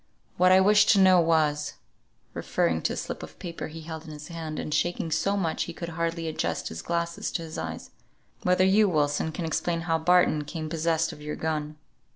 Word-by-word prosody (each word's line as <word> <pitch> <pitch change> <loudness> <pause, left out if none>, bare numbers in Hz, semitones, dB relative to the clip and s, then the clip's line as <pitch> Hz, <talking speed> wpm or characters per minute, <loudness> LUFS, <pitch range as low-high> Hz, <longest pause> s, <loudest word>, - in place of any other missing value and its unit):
"What 185 0 +4
I 185 - +7
wished 205 +2 +5
to 200 - +3
know 185 -2 +6
was," 155 -3 +1 0.6
referring 80 -1 0
to - - 0
a - - -6
slip - - -5
of - - -10
paper 170 -3 -6
he 160 +1 -9
held 160 0 -7
in - - -10
his 150 +1 -9
hand, 160 -2 -5
and 150 - -3
shaking 175 -1 0
so 195 +6 +1
much 165 -5 -1
he 170 - -7
could 170 - -5
hardly 165 0 -2
adjust 160 - -2
his 80 0 -6
glasses 170 0 -2
to 165 - -2
his 160 -1 -6
eyes, 80 0 -6 0.5
"whether 180 +1 +3
you, 200 +2 +4
Wilson, 150 -1 +1
can 165 +1 -4
explain 165 +1 -1
how 165 -1 0
Barton 175 -2 +3
came 155 +1 -5
possessed 165 0 0
of 150 - -12
your 150 0 -4
gun. 155 -1 -3
165 Hz, 205 wpm, -27 LUFS, 155-175 Hz, 0.6 s, I